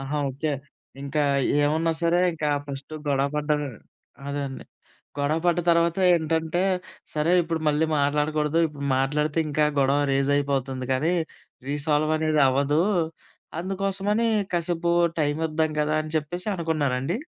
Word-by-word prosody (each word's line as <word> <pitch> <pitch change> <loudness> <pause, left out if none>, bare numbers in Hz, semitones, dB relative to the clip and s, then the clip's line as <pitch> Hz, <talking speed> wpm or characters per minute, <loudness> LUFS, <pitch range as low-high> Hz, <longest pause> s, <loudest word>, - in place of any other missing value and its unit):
ఆహా! 140 +2 -3
ఓకే. 145 +3 -2 0.5
ఇంకా 145 +2 -1 0.4
ఏమున్నా 160 +3 +1
సరే 170 +1 +3
ఇంకా 155 -2 -2 0.2
ఫస్టు 140 +2 -7
గొడవ 140 0 +2
పడ్డమే 150 -1 0 0.6
అదే 145 0 -2
అండి. 135 - -9 0.5
గొడవ 145 +3 +1
పడ్డ 175 0 +3
తర్వాత 170 +1 +3 0.2
ఏంటంటే, 160 +1 0 0.5
సరే 155 +3 +1
ఇప్పుడు 165 -1 -3
మళ్ళీ 150 +2 +2
మాట్లాడకూడదు. 150 +2 +1
ఇప్పుడు 145 -2 -8
మాట్లాడితే, 150 +4 0
ఇంకా 150 0 +2 0.2
గొడవ 140 +2 +3
రేజయిపోతుంది 135 -2 0
గదీ! 160 +7 +1 0.5
రీసాల్వ్ 150 +1 +1
అనేది 155 -1 +1
అవ్వదు. 140 +4 +2 0.8
అందుకోసమని 195 +4 0 0.2
కాసేపు 170 0 0 0.3
టైం 145 0 +1
ఇద్దాం 155 0 0
గదా 150 +1 0
అని 155 - -8
చెప్పేసి 175 +6 -2
అనుకున్నారాండీ? 155 - -1
150 Hz, 125 wpm, -25 LUFS, 145-165 Hz, 0.8 s, సరే